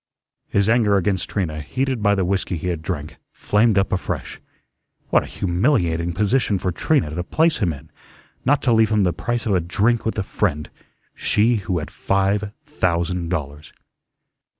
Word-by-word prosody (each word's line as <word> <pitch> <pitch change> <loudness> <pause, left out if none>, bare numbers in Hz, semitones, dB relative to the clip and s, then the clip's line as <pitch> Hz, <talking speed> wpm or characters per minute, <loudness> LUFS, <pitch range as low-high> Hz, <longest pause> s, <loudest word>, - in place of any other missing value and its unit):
His 100 0 +2
anger 110 -3 +3
against 95 -1 -1
Trina, 80 -6 -2
heated 130 - -2
by 100 0 +3
the 95 -2 0
whiskey 95 -1 -1
he 90 +3 -3
had 85 -3 -3
drank, 75 -3 -5
flamed 105 0 +2
up 95 - +2
afresh. 95 - -3 0.7
What - - +5
a - - -8
humiliating 85 - 0
position 105 +2 +1
for 90 0 -2
Trina 85 - 0
to 90 +2 -2
place 160 - +2
him 95 -6 +1
in, 70 - -10 0.5
not 140 +2 +2
to 120 - +3
leave 110 -1 +4
him 105 -2 +2
the 90 -2 +1
price 120 -1 -3
of 105 - +1
a 95 - +3
drink 105 +7 +1
with 110 - -2
a 105 - 0
friend, 80 -7 -2 0.4
she 115 +3 +2
who 95 -3 -2
had 75 - -5
five 100 +1 0
thousand 90 - -1
dollars! 75 -3 -5
95 Hz, 175 wpm, -21 LUFS, 85-110 Hz, 0.7 s, What